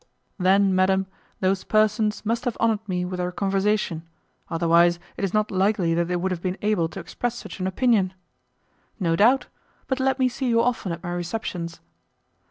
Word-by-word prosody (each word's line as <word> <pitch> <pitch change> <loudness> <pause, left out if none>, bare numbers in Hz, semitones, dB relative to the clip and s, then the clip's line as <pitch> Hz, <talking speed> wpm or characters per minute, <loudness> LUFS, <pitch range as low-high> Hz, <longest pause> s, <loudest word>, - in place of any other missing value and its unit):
"Then, 190 +1 +4
madam, 190 +1 +3 0.4
those 190 0 +1
persons 215 0 +1
must 230 +3 -1
have 245 - -1
honoured 220 -2 0
me 180 -1 -1
with 180 0 -5
their 180 0 -1
conversation; 195 -2 0 0.5
otherwise, 170 +1 +4 0.2
it - - -6
is 195 - 0
not 215 +1 +1
likely 190 -3 +2
that 170 +1 +1
they 180 - -1
would 185 +2 -1
have 175 -2 -3
been 185 +1 -2
able 205 -6 +1
to 195 - -8
express 235 +7 -3
such 240 - -9
an 185 - -1
opinion." 195 -2 +2 0.8
"No 170 -4 +1
doubt; 240 +9 +4 0.4
but 265 0 -2
let 265 0 +1
me 260 -1 +3
see 255 +1 -3
you 230 -1 +3
often 230 -6 0
at 170 +1 -6
my 175 - -4
receptions." 175 -1 -4
190 Hz, 180 wpm, -24 LUFS, 180-215 Hz, 0.8 s, Then